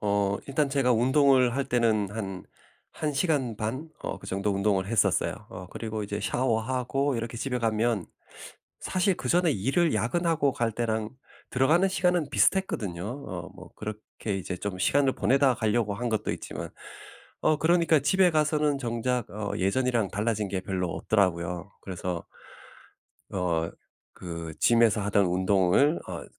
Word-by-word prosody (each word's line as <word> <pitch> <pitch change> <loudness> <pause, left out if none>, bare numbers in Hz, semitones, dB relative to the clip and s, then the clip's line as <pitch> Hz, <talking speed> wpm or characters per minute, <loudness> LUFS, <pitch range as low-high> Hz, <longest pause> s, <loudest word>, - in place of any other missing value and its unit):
어 100 -1 +1
일단 140 +1 +1
제가 135 -3 +2
운동을 130 +1 +4
할 140 - 0
때는 115 -6 +1
한 95 -4 -5 0.5
1 150 -1 -2
시간 135 - 0
반 130 +9 -3
어 - - -4
그 - - -12
정도 100 +2 -1
운동을 100 -1 +1
했었어요. 115 -2 +2 0.2
어 90 0 -8
그리고 110 -1 -5
이제 105 +1 -4
샤워하고 130 +4 0
이렇게 115 0 -4
집에 125 +1 -2
가면 115 -3 0 0.8
사실 185 0 +1
그전에 175 -2 +2
일을 140 - +1
야근하고 160 +2 +1
갈 115 -3 -1
때랑 110 -2 -1 0.4
들어가는 155 +9 +3
시간은 175 -4 +1
비슷했거든요 110 - +1
어 95 - -6
뭐 - - -12
그렇게 105 -1 -5
이제 90 0 -4
좀 100 0 -4
시간을 135 +7 +3
보내다 135 0 +3
가려고 110 -2 0
한 120 +3 -3
것도 110 -2 -1
있지만. - - -6 0.7
어 155 - +3
그러니까 165 -2 +3
집에 180 +6 +4
가서는 150 -2 +2
정작 120 -1 -2
어 105 0 -4
예전이랑 115 +2 +1
달라진 105 -1 -1
게 95 - -2
별로 90 -2 -2
없더라고요. 90 -2 0
그래서 90 -2 -4 1.1
어 85 -4 -1 0.4
그' 85 -2 -6
Gym에서 115 -2 +4
하던 100 -1 +2
운동을 95 - +3
어 - - -5
115 Hz, 310 characters per minute, -27 LUFS, 100-140 Hz, 1.1 s, 운동을